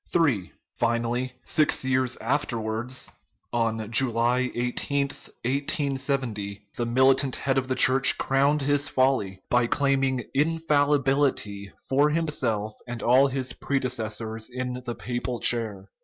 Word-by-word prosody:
(3) 135 - +1 0.3
Finally, 120 +2 0
six 155 -3 +2
years 130 -1 +1
afterwards 120 -1 -2 0.5
on 115 -2 -1
July 120 +1 +3
13, 140 +4 -1 0.3
1870 135 -6 -2
the 120 - -2
militant 130 +2 +3
head 135 -1 -1
of 130 - -5
the 130 - -1
Church 135 +1 +4
crowned 140 +2 +2
his 145 +1 +2
folly 115 -8 0
by 120 -1 +3
claiming 135 -2 +1
infallibility 145 - +1 0.2
for 145 +3 +3
himself 135 -10 -1
and 120 -1 -6
all 130 +3 +5
his 130 -2 -3
predecessors 115 -4 -3
in 125 0 -4
the 120 -1 -4
papal 120 0 -3
chair. 110 -5 0
130 Hz, 115 wpm, -26 LUFS, 115-140 Hz, 0.5 s, all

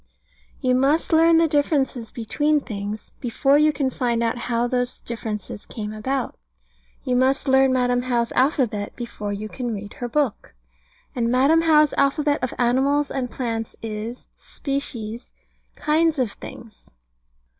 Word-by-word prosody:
You 255 -2 +2
must 280 +6 +2
learn 330 +1 +6
the 330 0 +4
differences 285 -5 0
between 295 +7 0
things, 210 -4 -6
before 275 +3 +2
you 305 0 +5
can 275 -3 -1
find 235 -2 0
out 230 - 0
how 235 0 +1
those 245 0 -1
differences 215 -4 -5
came 215 -1 -5
about. 255 +4 -2 0.7
You 250 - 0
must 265 +3 +2
learn 265 0 +5
Madam 245 -1 +2
How's 240 -2 0
alphabet 250 -7 +1
before 215 -4 -5
you 205 +1 -4
can 240 0 -4
read 205 +1 -8
her 245 - -2
book. 265 - -1 0.6
And 235 -2 0
Madam 275 +7 +4
How's 305 -2 +4
alphabet 290 +1 +2
of 255 - -1
animals 270 +4 +2
and 255 -2 -2
plants 225 -2 -3
is, 225 +2 -5
Species, 240 -5 -5 0.4
Kinds 315 +1 +2
of 250 -6 0
things. 225 +1 -12
250 Hz, 145 wpm, -23 LUFS, 230-280 Hz, 0.7 s, learn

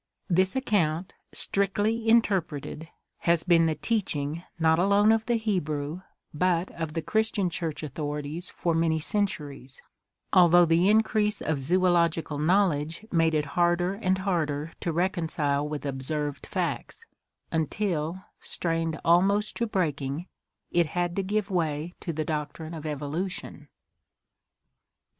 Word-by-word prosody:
This 185 +4 +3
account, 185 - 0 0.2
strictly 205 +3 0
interpreted, 180 -8 +1 0.3
has 170 -1 +2
been 170 -2 +4
the 160 - 0
teaching, 160 -9 -2 0.2
not 160 0 +3
alone 200 +3 +4
of 225 0 +1
the 240 - +2
Hebrew, 170 -7 -2 0.3
but 175 +2 +1
of 160 -1 -5
the 165 - -1
Christian 215 -1 +1
church 165 -2 -4
authorities 150 +3 -4
for 170 - -1
many 160 -1 +2
centuries, 150 -8 -3 0.5
al 180 -2 +7
though 175 +1 +7
the 170 +3 +3
increase 215 -1 +2
of 155 -3 -1
zoological 170 -1 +2
knowledge 165 0 +1
made 165 -2 +3
it 150 -1 +1
harder 175 +1 +2
and 190 -2 0
harder 165 -5 -1
to 170 - -1
reconcile 160 -5 0
with 150 -1 -5
observed 140 +2 -3
facts, 455 - -3 0.5
until, 165 +1 -1 0.2
strained 165 -1 -2
almost 195 +5 +3
to 235 - 0
breaking, 155 -6 -1 0.5
it 170 -2 +3
had 175 +2 -2
to 195 - +1
give 205 +1 -1
way 160 -1 -1
to 170 - -4
the 155 -1 -3
doctrine 155 +1 -4
of 160 -1 -6
Evolution. 150 +6 -4
170 Hz, 130 wpm, -27 LUFS, 155-190 Hz, 0.5 s, al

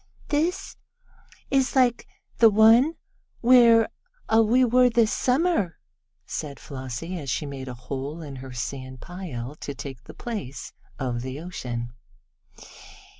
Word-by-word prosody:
"This 320 +5 -1 0.7
is 270 -1 +2
like 250 -3 +3 0.3
the 230 - +8
one 225 +9 +6 0.5
where 235 -2 +6 0.5
we 225 +3 +5
were 250 +1 +5
this 230 -2 +2
Summer," 255 - +1 0.5
said 140 -4 -5
Flossie, 135 +6 -6
as 140 -3 -6
she 150 - -1
made 135 -2 -7
a 125 - -6
hole 135 +5 -5
in 140 -3 -8
her 130 0 -9
sand 130 +1 -5
pile 150 -9 -7
to 145 - -6
take 135 -2 -8
the - - -11
place 205 - -6 0.2
of 125 -3 -2
the 130 +3 -5
ocean. 120 -9 -5
165 Hz, 125 wpm, -25 LUFS, -, 0.7 s, the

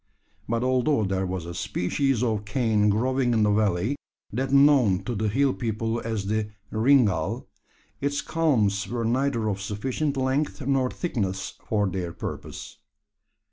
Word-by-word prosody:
But 115 +1 0
although 130 -1 +2
there 95 -1 -1
was 90 -2 -4
a 85 - -6
species 125 +9 0
of 110 -4 0
cane 105 -1 +2
growing 125 +4 +1
in 110 - +3
the 105 - +3
valley 105 +4 +1 0.4
that 130 +3 -1
known 140 -9 +5
to 120 - -3
the 110 0 -1
hill 135 +4 +2
people 115 0 -2
as 110 -3 -3
the 105 +1 -1 0.2
"ringall" 110 - +2 0.5
its 140 0 -1
culms 110 -11 +1
were 120 -1 -2
neither 120 -1 +1
of 100 -2 -2
sufficient 130 +8 -2
length 135 +4 0
nor 135 -2 +2
thickness 95 - -3
for 105 -2 +1
their 90 -2 -3
purpose. - - -7
115 Hz, 145 wpm, -26 LUFS, 100-130 Hz, 0.5 s, known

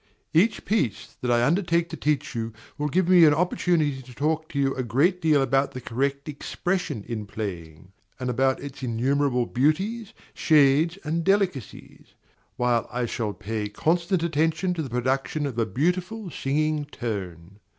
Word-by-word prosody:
Each 200 +8 +3
piece 165 - -1
that 125 - -2
I 120 0 +3
undertake 170 +1 +2
to - - -5
teach 150 -1 -1
you 115 -1 -3 0.2
will 150 0 -2
give 180 +4 +1
me 180 -2 +7
an 150 -1 +5
opportunity 160 -4 +1
to 125 0 -14
talk 155 +3 -1
to 140 - -6
you 135 -1 +2
a 130 - -3
great 155 +10 +1
deal 155 -4 +4
about 135 +1 +1
the 130 - -5
correct 140 +4 -2
expression 150 - -3
in 110 -3 -4
playing, 90 -5 -7 0.3
and 125 - -3
about 130 +2 +1
its 140 -1 -8
innumerable 125 +1 +1
beauties, 195 - 0 0.2
shades, 155 +3 +4
and 160 +2 -1
delicacies; 190 - -2 0.4
while 120 -2 +1
I 125 0 -1
shall 110 -2 -3
pay 105 0 -4
constant 170 - 0
attention 165 +3 +1
to 170 - -3
the 140 - -5
production 130 +5 -1
of 125 -4 -3
a 115 - +1
beautiful 180 - -1
singing 150 +2 0
tone. 100 - -6
140 Hz, 160 wpm, -25 LUFS, 120-165 Hz, 0.4 s, me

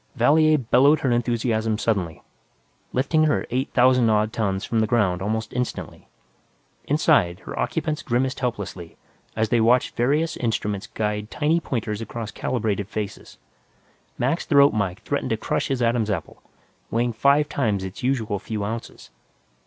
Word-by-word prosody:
Valier 155 +5 +4
bellowed 135 +4 +4
her 130 - +1
enthusiasm 115 -2 0
suddenly, 95 -8 -2 0.7
lifting 155 +5 +2
her 150 - +1
eight 130 +3 -1
thousand 125 -2 +5
odd 105 0 +1
tons 100 -3 -1
from 115 - 0
the 110 - +2
ground 100 -6 +1
almost 110 +2 -2
instantly. 125 0 -4 0.8
Inside, 140 - +2
her - - -7
occupants 155 0 -1
grimaced 130 -1 -1
helplessly 100 -8 -4 0.4
as 110 -1 0
they 120 - +3
watched 120 +3 +3
various 150 +7 +1
instruments 110 -2 -2
guide 105 -1 -3
tiny 155 +5 +1
pointers 110 -8 -3
across 115 0 -6
calibrated 105 -5 -2
faces. 105 -2 -6 0.8
Mac's 135 +8 0
throat 140 -2 +5
mike 100 -4 -2
threatened - - -2
to - - 0
crush - - -1
his 130 -3 -1
Adam's 115 -2 +1
apple, 100 - -4 0.5
weighing 120 +1 0
five 140 +5 +3
times 105 -10 -1
its 95 0 -7
usual 115 -6 -1
few 105 0 -4
ounces. 115 +2 -7
115 Hz, 145 wpm, -23 LUFS, 105-130 Hz, 0.8 s, thousand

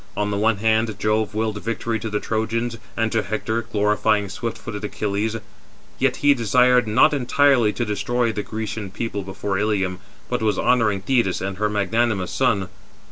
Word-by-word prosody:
On 105 0 0
the 100 - -1
one 110 +1 +2
hand, 110 0 +1
Jove 105 0 0
willed 110 -1 -1
victory 115 0 -2
to 110 - -4
the 105 0 -1
Trojans 115 +2 -2 0.2
and 115 -1 +1
to 110 - +2
Hector, 110 +2 -2
glorifying 105 -1 +1
swift 115 +4 -4
footed 105 0 -7
Achilles; 105 +2 -2 0.6
yet - - +2
he 145 - +7
desired 125 0 +3
not 130 +8 +4
entirely 135 -3 +3
to 120 - -2
destroy 115 +3 0
the 105 -1 -3
Grecian 110 0 -5
people 100 +1 -4
before 95 0 -3
Ilium, 95 -3 0 0.3
but 125 -1 -2
was 110 -1 +1
honouring 105 -6 +2
Thetis 115 -4 +1
and 95 0 -4
her 105 +1 0
magnanimous 105 -1 0
son. 105 -8 +1
110 Hz, 170 wpm, -22 LUFS, 105-115 Hz, 0.6 s, he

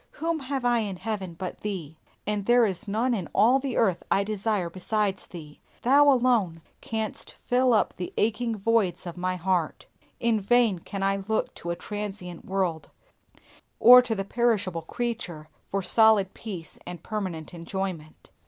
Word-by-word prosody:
Whom 330 0 -2
have 270 -2 -3
I 240 -1 +3
in 205 -4 -3
heaven 190 -3 -4
but 185 +2 -6
Thee, 180 -7 -5 0.3
and 205 -1 -2
there 240 0 +6
is 200 +2 -4
none 230 +5 +1
in 190 -8 -3
all 235 +7 +5
the 265 -2 -3
earth 190 -7 +2
I 200 - +3
desire 210 -2 -1
besides 190 +2 -2
Thee. 150 -4 -11 0.2
Thou 280 +4 +6
alone 235 - +2 0.2
canst 220 -1 -4
fill 250 +1 +3
up 220 - +2
the 180 - -5
aching 225 +1 0
voids 195 -4 +1
of 175 - -6
my 185 +1 -2
heart. 180 -2 -1 0.3
In 230 -2 +2
vain 220 -2 +3
can 195 +3 -5
I 195 0 +2
look 220 0 -1
to 170 - -7
a 170 - -1
transient 195 -4 -6
world, 185 -4 -2 0.9
or 250 +1 +10
to 245 -3 -2
the 195 -1 -3
perishable 205 -7 0
creature, 175 -6 -5 0.2
for 195 0 -1
solid 215 -2 +4
peace 185 -8 -8
and 175 -2 -8
permanent 185 -7 -4
enjoyment. 170 -2 -6
200 Hz, 160 wpm, -26 LUFS, 180-230 Hz, 0.9 s, or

